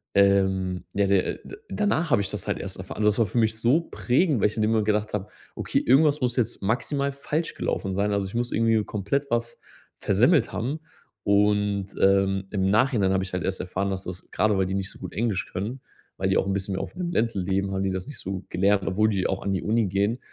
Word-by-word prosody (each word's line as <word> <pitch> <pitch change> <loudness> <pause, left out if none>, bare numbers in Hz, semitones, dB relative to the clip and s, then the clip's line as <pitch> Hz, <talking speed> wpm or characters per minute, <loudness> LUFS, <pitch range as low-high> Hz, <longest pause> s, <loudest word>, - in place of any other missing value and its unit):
ähm 95 -2 +3
ja 100 0 +2
der, 95 -2 +3
äh - - 0 0.2
äh 395 - -9
danach 175 -6 0
habe 115 - +4
ich 95 - -3
das - - -6
halt - - -1
erst - - -6
erfahren. - - -8
Also, 105 0 +4
das 105 - -4
war 115 - +3
für 120 - -5
mich 110 0 +1
so 125 +9 +3
prägend, 135 - +1
weil - - +5
ich 105 - -6
in 110 - +1
dem 110 - +2
Moment 110 -2 +2
gedacht 105 0 0
habe: 105 0 -3 0.3
„Okay, - - 0
irgendwas 145 +3 +4
muss 125 -1 0
jetzt 115 -4 -1
maximal 140 +6 0
falsch 150 +4 -3
gelaufen 95 -1 -2
sein. 100 +1 +1
Also 100 -1 0
ich 100 - -9
muss 120 +1 -1
irgendwie 115 -1 +2
komplett 135 +8 -2
was 120 0 -1 0.4
versemmelt - - +3
haben.“ 135 +8 -2 0.4
Und, 100 -1 +2
ähm, 95 0 +3
im 95 -2 +1
Nachhinein 110 -4 +3
habe 95 0 +1
ich 95 - -7
halt 90 - -2
erst 95 -1 -2
erfahren, 95 +2 -2
dass 95 0 -4
das 90 0 -8
grade 105 -2 +2
weil 95 - +2
die 95 - -3
nicht 95 -1 -2
so - - -14
gut - - -7
Englisch 105 0 -1
können, 110 +8 -4 0.4
weil - - 0
die - - +3
auch - - +1
'n 100 - 0
bisschen 100 0 -2
mehr - - -2
auf - - -8
dem 175 -1 -3
Land 115 -5 0
leben, 95 +1 -1
haben 95 0 -1
die 95 - 0
das 95 +4 -4
nicht 145 -5 -9
so 95 - -5
gut 95 0 -7
gelernt, 100 +1 +2
obwohl 105 +3 +2
die 95 -3 0
auch 95 - -3
an 100 - -1
die 95 - -1
Uni 110 +1 +2
gehen. 100 +6 0
105 Hz, 250 wpm, -25 LUFS, 95-115 Hz, 0.4 s, weil